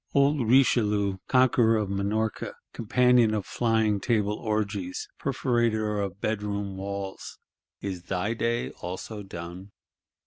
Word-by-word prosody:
Old 140 Hz, -3 st, +3 dB
Richelieu, 105 Hz, -6 st, +3 dB
conqueror 120 Hz, -3 st, +4 dB
of 105 Hz, -2 st, -1 dB
Minorca, 100 Hz, +3 st, -2 dB, 0.2 s
companion 120 Hz, -1 st, +3 dB
of 105 Hz, -3 st, -2 dB
Flying 110 Hz, -3 st, +1 dB
Table 105 Hz, -2 st, +1 dB
orgies, 105 Hz, -4 st, -2 dB
perforator 115 Hz, -6 st, 0 dB
of 95 Hz, -1 st, -5 dB
bedroom 100 Hz, -2 st, -2 dB
walls, 100 Hz, 0 st, -6 dB, 0.4 s
is 95 Hz, -3 st, -4 dB
thy 95 Hz, +5 st, -1 dB
day 115 Hz, +1 st, -1 dB
also 95 Hz, +4 st, -6 dB
done? 90 Hz, +1 st, -8 dB
105 Hz, 110 wpm, -27 LUFS, 100-115 Hz, 0.4 s, conqueror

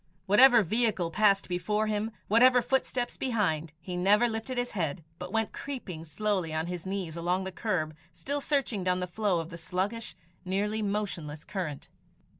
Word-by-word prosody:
Whatever 235 Hz, +3 st, +7 dB
vehicle 205 Hz, -3 st, +1 dB
passed 200 Hz, 0 st, +3 dB
before 210 Hz, +4 st, 0 dB
him, 215 Hz, 0 st, -1 dB, 0.2 s
whatever 250 Hz, +3 st, +6 dB
footsteps 255 Hz, -2 st, 0 dB
behind, 180 Hz, -, 0 dB
he 180 Hz, +1 st, -6 dB
never 205 Hz, +6 st, +4 dB
lifted 225 Hz, +3 st, -3 dB
his 245 Hz, 0 st, -1 dB
head, 165 Hz, -4 st, -2 dB, 0.2 s
but 180 Hz, 0 st, -6 dB
went 225 Hz, 0 st, 0 dB
creeping 195 Hz, -, -6 dB
slowly 185 Hz, +1 st, -1 dB
on 160 Hz, +1 st, 0 dB
his 180 Hz, 0 st, -5 dB
knees 190 Hz, -4 st, -3 dB
along 175 Hz, +3 st, 0 dB
the 190 Hz, -, -4 dB
curb 175 Hz, -6 st, -2 dB, 0.2 s
still 285 Hz, -, -3 dB
searching 270 Hz, -9 st, 0 dB
down 180 Hz, 0 st, +1 dB
the 180 Hz, -, -1 dB
flow 185 Hz, 0 st, 0 dB
of 165 Hz, +1 st, -6 dB
the 170 Hz, -, -8 dB
sluggish, 200 Hz, +6 st, -3 dB, 0.3 s
nearly 205 Hz, +3 st, -1 dB
motionless 185 Hz, -8 st, -3 dB
current. 165 Hz, -8 st, -4 dB
195 Hz, 165 wpm, -29 LUFS, 175-225 Hz, 0.3 s, Whatever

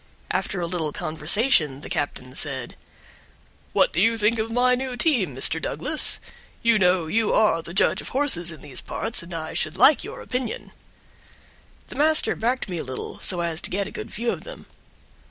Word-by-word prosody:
After 195 Hz, -, -2 dB
a 175 Hz, -, -2 dB
little 165 Hz, -3 st, -2 dB
conversation 155 Hz, -, +2 dB
the -, -, -9 dB
captain 130 Hz, -3 st, -3 dB
said: 135 Hz, -4 st, -3 dB, 1.0 s
"What -, -, +2 dB
do 175 Hz, -, +1 dB
you 230 Hz, +2 st, +3 dB
think 225 Hz, +1 st, +2 dB
of 220 Hz, +1 st, -2 dB
my 250 Hz, +2 st, +3 dB
new 255 Hz, 0 st, -3 dB
team, 235 Hz, -, +1 dB
Mr. 155 Hz, +5 st, +3 dB
Douglas? 295 Hz, -, +1 dB, 0.4 s
You 230 Hz, -2 st, +4 dB
know, 180 Hz, -2 st, +3 dB
you 220 Hz, +7 st, 0 dB
are 210 Hz, -6 st, +3 dB
the 165 Hz, -, -9 dB
judge 190 Hz, -, +2 dB
of -, -, -7 dB
horses 250 Hz, -, +4 dB
in 155 Hz, -, -11 dB
these 140 Hz, -4 st, -4 dB
parts, 230 Hz, -, -4 dB
and 170 Hz, +2 st, -12 dB
I 160 Hz, -2 st, -5 dB
should 155 Hz, -, -2 dB
like 295 Hz, -, +5 dB
your 460 Hz, +5 st, -8 dB
opinion." 250 Hz, -2 st, -5 dB, 1.2 s
The -, -, -9 dB
master 310 Hz, +2 st, +4 dB
backed 245 Hz, +3 st, -1 dB
me 180 Hz, -3 st, -4 dB
a -, -, -4 dB
little, 130 Hz, -1 st, -7 dB
so 175 Hz, -2 st, -2 dB
as 170 Hz, -1 st, -2 dB
to -, -, 0 dB
get 200 Hz, +1 st, -2 dB
a -, -, -9 dB
good -, -, -7 dB
view 235 Hz, +1 st, -2 dB
of -, -, -6 dB
them. -, -, -11 dB
190 Hz, 190 wpm, -23 LUFS, 160-245 Hz, 1.2 s, like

